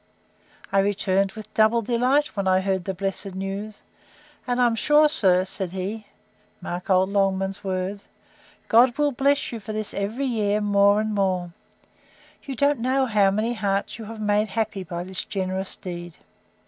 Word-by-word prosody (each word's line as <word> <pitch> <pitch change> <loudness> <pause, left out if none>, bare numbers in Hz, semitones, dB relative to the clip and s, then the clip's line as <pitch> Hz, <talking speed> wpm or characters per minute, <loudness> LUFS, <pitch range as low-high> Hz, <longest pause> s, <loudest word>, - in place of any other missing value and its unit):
I 195 - +3
returned 195 -1 +1
with 215 -1 -11
double 220 +1 +3
delight, 250 +6 +1
when 200 -2 -1
I 185 0 +3
heard 190 -2 -1
the 190 - -2
blessed 195 0 -3
news; 195 +2 -5 0.6
and 245 0 0
I 250 - +5
am 235 - +2
sure, 295 +6 +4
sir, 185 -11 +3
said 190 -1 -4
he, 205 +3 -5 0.5
(mark 175 +2 -6
old 190 0 +3
Longman's 195 0 0
words,) 190 +1 -3 0.6
God 240 +2 +5
will 295 -1 +2
bless 280 +2 +1
you 230 - -5
for 215 +1 -7
this 215 -1 -3
every 215 +7 -2
year 210 -4 0
more 200 0 +4
and 215 0 -2
more! 185 -3 -1 0.9
You 275 -2 -6
don't 285 +1 +2
know 260 +3 +1
how 210 -5 +3
many 215 +4 0
hearts 200 -1 -2
you 220 - -7
have 225 +1 -8
made 210 0 +1
happy 215 -1 -2
by 175 0 -5
this 185 0 -3
generous 190 -1 -3
deed! 175 -2 -8
205 Hz, 170 wpm, -24 LUFS, 190-225 Hz, 0.9 s, I